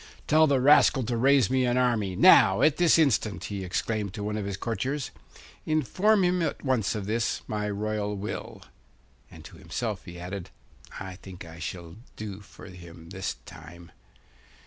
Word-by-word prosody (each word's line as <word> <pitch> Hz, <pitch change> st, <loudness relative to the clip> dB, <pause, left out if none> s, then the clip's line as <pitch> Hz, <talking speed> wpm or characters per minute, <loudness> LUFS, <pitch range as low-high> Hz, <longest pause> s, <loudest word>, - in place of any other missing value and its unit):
'Tell 155 Hz, +1 st, +4 dB
the 140 Hz, -2 st, +2 dB
rascal 135 Hz, 0 st, +5 dB
to 120 Hz, +1 st, -2 dB
raise 130 Hz, -1 st, +3 dB
me 130 Hz, 0 st, +2 dB
an 125 Hz, 0 st, +1 dB
army, 115 Hz, -7 st, +1 dB
now 110 Hz, -, +6 dB
at 150 Hz, -1 st, +4 dB
this 175 Hz, -2 st, +4 dB
instant!' 120 Hz, -9 st, +1 dB
he 100 Hz, -2 st, -5 dB
exclaimed 100 Hz, +2 st, -3 dB
to 105 Hz, -, -5 dB
one 105 Hz, +1 st, -3 dB
of 105 Hz, -2 st, -3 dB
his 100 Hz, -1 st, -4 dB
courtiers. 125 Hz, +6 st, -3 dB, 0.5 s
'Inform 185 Hz, -, +2 dB
him 180 Hz, 0 st, +1 dB
at 155 Hz, -3 st, -3 dB
once 125 Hz, -6 st, 0 dB
of 105 Hz, -2 st, -4 dB
this, 115 Hz, +3 st, -1 dB
my 105 Hz, -1 st, -3 dB
royal 105 Hz, 0 st, -2 dB
will.' 105 Hz, +3 st, -6 dB, 0.7 s
And -, -, -14 dB
to -, -, -12 dB
himself 110 Hz, -6 st, -5 dB
he 90 Hz, 0 st, -10 dB
added, 90 Hz, +1 st, -6 dB, 0.5 s
'I 95 Hz, -1 st, -7 dB
think 95 Hz, -2 st, -11 dB
I 85 Hz, +1 st, -12 dB
shall 85 Hz, 0 st, -7 dB, 0.2 s
do 105 Hz, -2 st, -7 dB
for 100 Hz, -, -15 dB
him 85 Hz, -2 st, -12 dB
this 95 Hz, 0 st, -4 dB
time. 85 Hz, +1 st, -13 dB
105 Hz, 170 wpm, -27 LUFS, 95-130 Hz, 0.7 s, now